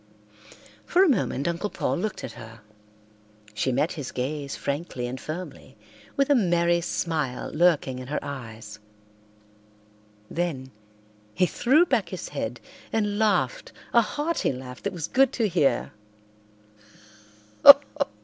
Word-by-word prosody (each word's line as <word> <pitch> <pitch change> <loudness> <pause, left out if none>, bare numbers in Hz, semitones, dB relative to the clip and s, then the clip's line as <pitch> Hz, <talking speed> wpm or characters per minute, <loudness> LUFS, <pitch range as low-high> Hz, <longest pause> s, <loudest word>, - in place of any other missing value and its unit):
For 365 +2 +3
a - - +4
moment 185 - 0
Uncle 170 +5 -2
Paul - - -2
looked 205 +4 -4
at 120 - -5
her. 115 -1 -12 0.9
She 105 +5 -1
met 140 +6 +1
his 145 -6 -6
gaze 140 +2 -4
frankly 140 -3 -4
and 130 +2 -6
firmly, 155 -6 -8 0.4
with 275 +1 +2
a - - +8
merry 175 -6 +2
smile 155 -7 -2
lurking 150 -6 +2
in 130 - -8
her 150 - -2
eyes. 110 -6 -8 1.5
Then 145 -6 -3 0.6
he 180 - +3
threw 275 - +3
back 230 - 0
his 185 -2 -6
head 120 -4 -4 0.3
and 210 -2 0
laughed 190 -13 0 0.2
a 235 - +7
hearty 295 +9 -1
laugh 125 -1 -9
that 200 - -2
was 165 -4 -4
good 270 +1 +3
to 225 -3 +1
hear. 145 -9 +1
160 Hz, 130 wpm, -25 LUFS, 130-200 Hz, 1.5 s, a